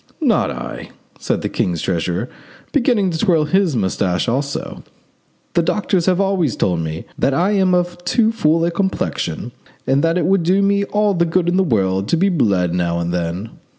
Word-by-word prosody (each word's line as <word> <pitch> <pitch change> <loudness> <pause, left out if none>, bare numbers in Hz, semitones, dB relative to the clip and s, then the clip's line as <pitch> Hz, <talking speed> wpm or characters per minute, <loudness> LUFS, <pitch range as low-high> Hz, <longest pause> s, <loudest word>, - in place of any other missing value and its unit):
"Not - - +2
I," - - -7 0.3
said - - -2
the - - 0
king's 85 -2 -1
treasurer, 90 +5 -2 0.4
beginning 240 -9 +2
to 160 - -3
twirl 165 -6 +2
his 180 -1 +1
moustache 95 -4 0
also: 140 +4 -3 0.7
"the 170 - +3
doctors 180 0 0
have 185 0 +3
always 190 - +1
told 90 -3 0
me 80 0 -4
that 135 - +2
I 180 +7 +2
am 190 -3 +3
of 175 0 -2
too 225 +2 +2
full 165 -6 +2
a 170 - 0
complexion 170 - -2 0.3
and 135 +2 +2
that 165 +1 +2
it 175 - 0
would 190 +1 +3
do 185 +4 +2
me 200 0 +2
all 210 0 +1
the 170 -2 +2
good 170 +1 0
in 175 - +1
the 190 - +4
world 95 - 0
to 170 - +1
be 195 +4 +2
bled 100 - +1
now 85 -1 0
and 85 0 -2
then. 90 +5 -3
165 Hz, 190 wpm, -19 LUFS, -, 0.7 s, the